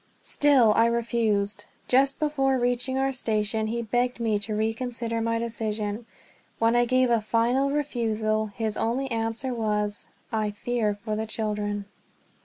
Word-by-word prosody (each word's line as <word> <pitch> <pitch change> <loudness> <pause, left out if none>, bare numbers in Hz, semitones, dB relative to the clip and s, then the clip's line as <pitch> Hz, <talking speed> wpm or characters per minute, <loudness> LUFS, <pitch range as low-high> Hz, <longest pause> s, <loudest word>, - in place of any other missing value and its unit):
Still 265 -7 +4
I 230 +2 +4
refused. 225 -3 0 0.2
Just 270 +2 +3
before 270 -3 +1
reaching 245 +1 0
our 270 0 +1
station 220 -3 -1
he 235 +2 -2
begged 245 +3 0
me 220 -3 +1
to 210 +1 -3
reconsider 230 +1 -2
my 230 0 0
decision. 220 -1 -3 0.5
When 230 +1 +3
I 240 0 +4
gave 255 0 +2
a 230 -2 +3
final 235 +5 +2
refusal, 225 -7 0
his 215 +1 -3
only 260 +4 -1
answer 225 +3 -1
was: 210 -2 -1 0.2
"I 215 -1 0
fear 210 0 -1
for 215 -2 -1
the 220 +1 -3
children." 210 -2 -2
230 Hz, 145 wpm, -26 LUFS, 215-245 Hz, 0.5 s, Still